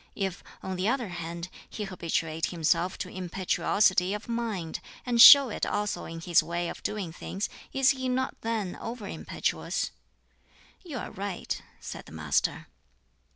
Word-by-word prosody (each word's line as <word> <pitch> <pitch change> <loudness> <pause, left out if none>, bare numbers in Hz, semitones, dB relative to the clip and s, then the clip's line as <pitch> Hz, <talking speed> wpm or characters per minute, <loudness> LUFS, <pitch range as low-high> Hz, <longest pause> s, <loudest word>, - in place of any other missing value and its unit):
If, 190 -3 -3 0.2
on 190 -1 -3
the 185 +3 0
other 240 -3 0
hand, 170 0 -5 0.2
he 215 - -5
habituate 165 -4 -2
himself 170 +1 +1
to - - -4
impetuosity 185 +1 +1
of 210 - -7
mind, 225 -9 -3 0.3
and 240 -2 +4
show 280 -1 +11
it - - -5
also 205 0 -1
in 165 0 -7
his 170 0 +4
way 170 0 -2
of - - -8
doing 195 -6 -3
things, 195 +3 -4 0.2
is 270 +1 +4
he 260 -2 -2
not 260 +1 0
then 220 -5 -2
over 230 -3 -6
impetuous?" - - -2 0.9
"You 315 -8 -6
are - - -5
right," 195 -2 -4 0.2
said - - -8
the - - -12
Master. 75 -2 0
190 Hz, 155 wpm, -28 LUFS, 170-230 Hz, 0.9 s, show